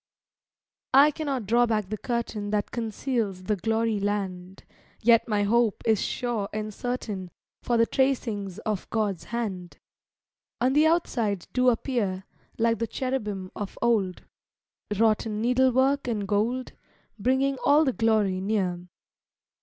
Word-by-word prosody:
I 285 +3 +7
cannot 280 -7 -3
draw 240 +4 +3
back 215 -4 -1
the 215 - -3
curtain 235 -4 -3
That 205 -1 -1
conceals 225 -4 -2
the 210 +2 0
glory 225 +2 0
land, 190 -2 -3 0.4
Yet 230 0 +4
my 210 -2 +1
hope 230 +1 +2
is 220 -3 +3
sure 235 -5 -2
and 215 0 -4
certain, 210 -6 -4 0.3
For 240 - +1
the 230 - +5
tracings 225 -8 -1
of 210 -3 -2
God's 205 -7 -1
hand 200 -7 -4 0.8
On 255 +3 +2
the 305 +2 +5
outside 230 - 0
do 250 0 +4
appear, 220 -6 -1 0.3
Like 230 0 +2
the 230 - -1
cherubim 210 -9 -3
of 205 -2 -6
old, 210 -6 0 0.7
Wrought 220 0 +3
in 210 -1 -3
needle 250 +3 +3
work 265 +2 +2
and 210 -4 -2
gold, 225 +5 0 0.5
Bringing 265 +4 +1
all 295 +2 +5
the 265 - +1
glory 215 -5 +1
near. 185 -4 -1
225 Hz, 140 wpm, -26 LUFS, 205-245 Hz, 0.8 s, I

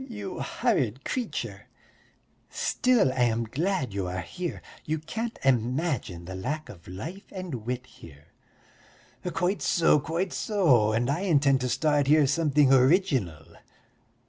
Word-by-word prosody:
"Ugh, 265 - -10
you 205 -5 -6
horrid 135 - -1
creature! 250 -3 -4 0.8
Still, 245 - +2
I 125 -2 +2
am 115 0 0
glad 140 - -2
you 100 -2 -2
are 90 0 -3
here; 175 - -6 0.2
you 155 +1 -1
can't 225 +9 -5
imagine 125 - 0
the 95 - -7
lack 150 +12 -4
of 85 -4 -13
life 160 - -8
and 185 -4 -6
wit 125 0 -3
here." 75 - -16 1.0
"Quite 180 +4 -1
so, 165 -3 +3
quite 165 +7 -2
so, 145 - +3
and 115 +3 0
I 140 +5 0
intend 145 -8 +3
to 125 - -1
start 145 0 +1
here 150 0 +5
something 145 -1 +3
original. 130 - +2
145 Hz, 140 wpm, -27 LUFS, 120-180 Hz, 1.0 s, here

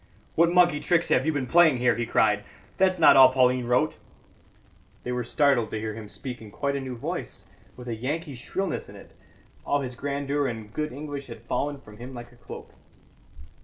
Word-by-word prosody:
"What 170 +1 +3
monkey 175 -4 +4
tricks 175 +1 +1
have 130 +4 +2
you 160 - +2
been 145 -3 -1
playing 160 0 +5
here?" 120 -2 +2
he 120 +1 -2
cried. - - +2 0.3
"That's 185 -1 +3
not 165 - +7
all 130 -1 +8
Pauline 125 -1 +2
wrote." 125 +1 +1 1.1
They 125 - -4
were 125 0 -2
startled 130 -3 +2
to 110 - -4
hear 110 0 -4
him 110 -1 -9
speak 125 0 -7
in 110 - -10
quite 140 +6 -2
a 140 - -2
new 130 -1 -5
voice, - - -5 0.3
with 125 0 -10
a 120 - -2
Yankee 145 +7 -4
shrillness 190 +9 -4
in - - -12
it; - - -14 0.5
all 145 - 0
his 125 -2 -5
grandeur 140 +2 -2
and 110 -3 -6
good 150 0 -2
English 145 0 -6
had 115 -2 -10
fallen 145 +4 -2
from 105 -4 -15
him 125 +3 -9
like 120 0 -9
a - - -19
cloak. 115 -5 -11
130 Hz, 200 wpm, -26 LUFS, 120-145 Hz, 1.1 s, all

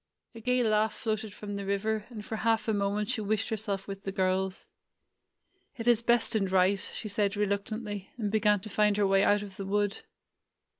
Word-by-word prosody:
A 230 - -9
gay 250 +2 +2
laugh 215 0 +2
floated 220 -1 -2
from 205 0 -7
the 200 - -4
river, 210 +2 -1
and 215 -4 -8
for 220 - -4
half 225 0 +1
a 220 - +2
moment 205 +1 0
she 220 - -1
wished 210 +1 0
herself 205 -3 -2
with 195 -1 -6
the 195 - -3
girls. 190 0 0 1.1
"It 230 0 -5
is 235 -2 +5
best 235 -1 +2
and 195 -4 0
right," 190 +1 +4
she 215 - -5
said 205 0 0
reluctantly, 205 0 -2
and 210 -4 -2
began 210 -2 +3
to 215 - -8
find 210 +1 +3
her 205 - +3
way 195 0 +4
out 205 0 +3
of 195 -2 -10
the 195 - -5
wood. 205 0 0
210 Hz, 200 wpm, -29 LUFS, 200-220 Hz, 1.1 s, is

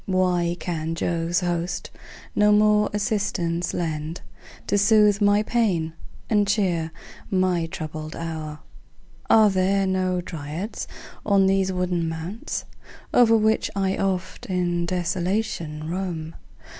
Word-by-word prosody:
Why 180 -2 +1
can 165 -1 -3
Jove's 170 +1 0
host 175 0 -2 0.4
no 210 0 +5
more 210 0 +4
assistance 200 -5 -1
lend, 160 -1 -3 0.4
To - - 0
soothe 210 0 +4
my 205 +1 +4
pains, 195 -9 +1 0.4
and 205 -2 +2
cheer 180 -6 +1 0.4
my 185 -3 +1
troubled 155 -1 -6
hour? 160 -2 -5 0.7
Are 215 -2 +6
there 195 +1 +2
no 185 -1 0
Dryads 165 +4 -5 0.4
on 200 -2 +4
these 190 0 +2
wooded 180 -1 0
mounts 165 +6 -4 0.5
O'er 230 -2 +6
which 220 0 +2
I 195 -1 +1
oft 185 -1 -2
in 175 -2 0
desolation 175 -3 -2
roam? 170 -3 -4
180 Hz, 115 wpm, -24 LUFS, 165-200 Hz, 0.7 s, Are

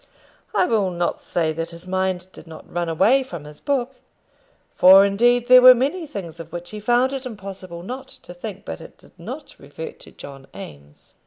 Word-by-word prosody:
I - - +4
will 210 - +1
not 175 -1 -2
say 160 -2 -1
that 165 +1 -4
his 170 +1 -11
mind 185 -1 -1
did - - -13
not 160 -1 -12
run 175 -1 -1
away 215 +12 +4
from 175 - -8
his 150 0 -12
book, 265 -2 -2 0.7
for 190 +2 +8
indeed 240 +4 +2
there 255 0 +9
were 255 0 +10
many 295 +7 -1
things 170 - -8
of 165 0 -9
which 175 +1 -7
he 215 - -6
found 245 +5 +2
it 270 -1 -4
impossible 195 -7 -8
not 260 +6 -7
to 175 - -12
think; 190 +2 -8
but 80 0 -6
it - - -13
did - - -20
not - - -8
revert - - -9
to - - -14
John 135 -1 -12
Eames. 75 -6 -12
190 Hz, 195 wpm, -22 LUFS, 170-245 Hz, 0.7 s, were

